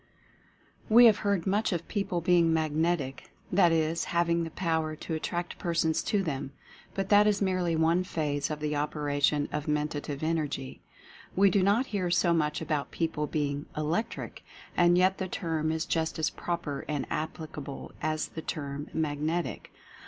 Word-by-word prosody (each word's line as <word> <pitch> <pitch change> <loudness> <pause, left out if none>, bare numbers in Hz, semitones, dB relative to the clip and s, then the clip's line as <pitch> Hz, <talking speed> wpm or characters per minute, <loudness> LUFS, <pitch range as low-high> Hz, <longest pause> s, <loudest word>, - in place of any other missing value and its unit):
We 235 +2 +8
have 220 -3 +7
heard 200 -5 0
much 205 +3 +1
of 170 -2 -3
people 195 -4 -1
being 170 -1 +4
"Magnetic," 155 -3 0 0.2
that 180 -2 +5
is, 165 0 +1
having 170 0 +1
the 165 - -4
power 160 -2 -1
to 160 - -6
attract 175 +2 -3
persons 165 -2 +1
to 205 -3 +1
them 140 -4 -3 0.2
— - - -23
but 195 0 -2
that 210 0 +6
is 210 -1 +2
merely 185 -4 +1
one 165 +3 +3
phase 145 -5 -2
of 150 -1 -4
the 150 0 -1
operation 145 0 0
of 150 0 -3
Men 150 0 +1
tative 145 -1 -5
Energy. 150 -5 -2 0.5
We 195 0 +5
do 195 - +3
not 205 +7 +3
hear 195 -7 -2
so 175 0 +3
much 150 -2 0
about 150 -2 -1
peo 165 -1 -1
ple 150 -1 -3
being 145 -1 -2
"Electric," 165 +9 -2 0.3
and 175 0 +5
yet 185 +1 +3
the 190 - -2
term 160 -4 -1
is 160 0 -1
just 160 -1 -1
as 155 -2 0
proper 170 -5 -3
and 150 -2 -2
applicable 155 -3 -5
as 155 0 -1
the 160 - -7
term 145 -1 -5
"Magnetic." 155 +2 -2
160 Hz, 170 wpm, -29 LUFS, 150-175 Hz, 0.5 s, We